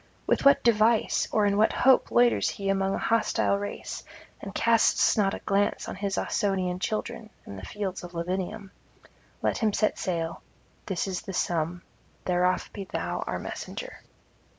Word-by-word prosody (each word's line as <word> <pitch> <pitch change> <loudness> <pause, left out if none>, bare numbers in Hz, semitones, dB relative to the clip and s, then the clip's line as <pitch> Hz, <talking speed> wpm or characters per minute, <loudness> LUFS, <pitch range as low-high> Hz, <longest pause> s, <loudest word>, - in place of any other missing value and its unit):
with - - +1
what 280 0 +6
device 225 0 +3
or 210 -1 +3
in 200 0 +2
what 215 +2 +4
hope 260 -1 +4
loiters 240 0 +3
he 195 -3 -4
among 195 0 +1
a - - -2
hostile 225 -3 +1
race, 205 0 -6 0.4
and 200 0 -8
casts 230 -1 +4
not 195 -3 +2
a - - -7
glance 200 0 +1
on - - -4
his 195 0 -2
Ausonian 190 -4 0
children 215 +2 -3 0.2
and 100 - -8
the 95 - -8
fields 195 -3 -4
of 175 0 -9
Lavinium? 190 +4 -3 0.7
Let - - +1
him 220 -3 +1
set 215 - +1
sail: 165 -3 -2 0.5
this 190 -1 -1
is 185 -2 -3
the 195 -3 -7
sum: 175 0 -1 0.4
thereof 180 0 +1
be 200 - -6
thou - - -3
our - - -2
messenger.' - - -7
200 Hz, 165 wpm, -27 LUFS, 185-220 Hz, 0.7 s, what